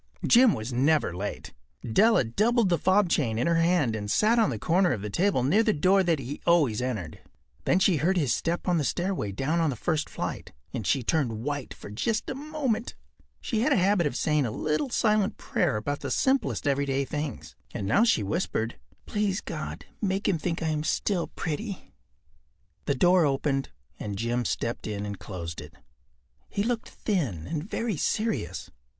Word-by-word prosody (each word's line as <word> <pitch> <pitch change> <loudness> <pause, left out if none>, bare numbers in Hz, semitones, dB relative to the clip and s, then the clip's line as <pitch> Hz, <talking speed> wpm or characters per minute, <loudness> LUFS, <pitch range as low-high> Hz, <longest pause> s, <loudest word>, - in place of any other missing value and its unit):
Jim 245 -3 +6
was 110 +4 -5
never 140 - +2
late. 100 +3 -5 0.3
Della 215 - +4
doubled 215 - +2
the 170 - +2
fob 190 +1 +3
chain 120 -9 0
in 120 - +1
her 170 0 +3
hand 165 -9 +2
and 105 -1 -4
sat 220 - +3
on 225 - +4
the 120 - -3
corner 175 - +2
of 105 -5 -5
the 105 - -4
table 180 - +2
near 160 - +4
the 220 -2 +2
door 190 +6 +4
that 170 -3 +2
he 135 +2 -6
always 145 -11 +3
entered. 110 -11 -4 0.5
Then - - +3
she 190 -3 +3
heard 180 +6 +1
his 145 -8 +2
step 170 +3 -2
on 175 -2 +3
the - - 0
stair 175 +7 -1
away 105 - -3
down 140 - -1
on 165 -2 +2
the 135 - -2
first 155 +5 -1
flight, - - -5 0.2
and 115 -7 -3
she 135 - +2
turned 115 -6 0
white 145 -1 -3
for - - -10
just 215 - -1
a - - -2
moment. 275 -5 -2 0.5
She 225 - -1
had 285 +6 +2
a - - +5
habit 185 -3 +3
of 140 - -4
saying 150 0 +1
a - - -2
little 155 - -1
silent 215 -4 +1
prayer 150 -11 0
about 145 +7 -3
the - - -5
simplest 265 - +1
everyday 140 -1 +1
things, 145 -3 -5 0.2
and 100 - -4
now 110 - +4
she 225 - +3
whispered: 115 - -2 0.3
“Please 205 -3 0
God, - - -6 0.2
make 195 -1 0
him 180 -5 +1
think 165 +1 -2
I 160 - 0
am 150 -1 -1
still 175 +2 0
pretty.” 195 +6 -5 0.9
The 140 - +1
door 180 +5 +4
opened 135 -1 0 0.3
and 100 -2 -4
Jim 120 +2 -1
stepped 115 -1 -2
in 105 -1 -3
and 100 -2 -6
closed 85 -4 -6
it. - - -12 0.7
He 200 - -1
looked 235 0 -2
thin 135 - -2
and 150 - -3
very 230 -7 -2
serious. 210 - -2
155 Hz, 190 wpm, -27 LUFS, 120-195 Hz, 0.9 s, Jim